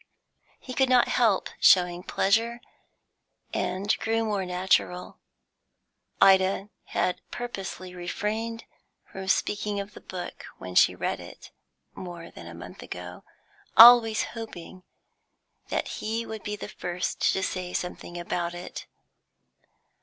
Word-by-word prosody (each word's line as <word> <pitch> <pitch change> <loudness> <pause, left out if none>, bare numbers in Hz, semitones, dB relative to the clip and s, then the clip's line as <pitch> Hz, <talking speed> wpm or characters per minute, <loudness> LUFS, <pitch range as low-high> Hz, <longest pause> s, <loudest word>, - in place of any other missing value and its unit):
He 255 - -8
could 265 0 +2
not 250 -1 +5
help 220 -6 +2
showing 180 -1 +5
pleasure, 225 +6 +1 0.9
and 195 +3 0
grew 225 0 0
more 200 -4 -1
natural. 180 0 0 1.0
Ida 195 +1 +4 0.2
had 180 -1 -1
purposely 195 -6 -6
refrained 215 +6 -3 0.5
from 190 0 -7
speaking 205 +1 0
of 200 0 -6
the - - -12
book 180 -1 -7
when 90 0 -8
she - - +5
read - - -2
it, - - -12 0.4
more 175 -2 -9
than 85 - -11
a 85 - -9
month 85 - -10
ago, 90 0 -8 0.5
always 230 -2 +9
hoping 190 -5 -8 0.9
that - - -1
he 225 +2 -3
would 220 -2 -7
be 210 -1 -4
the - - -7
first 175 +1 -1
to 190 - -1
say 185 -1 -3
something 180 -1 -5
about 175 0 -3
it. 175 - -8
190 Hz, 125 wpm, -27 LUFS, 180-225 Hz, 1.0 s, always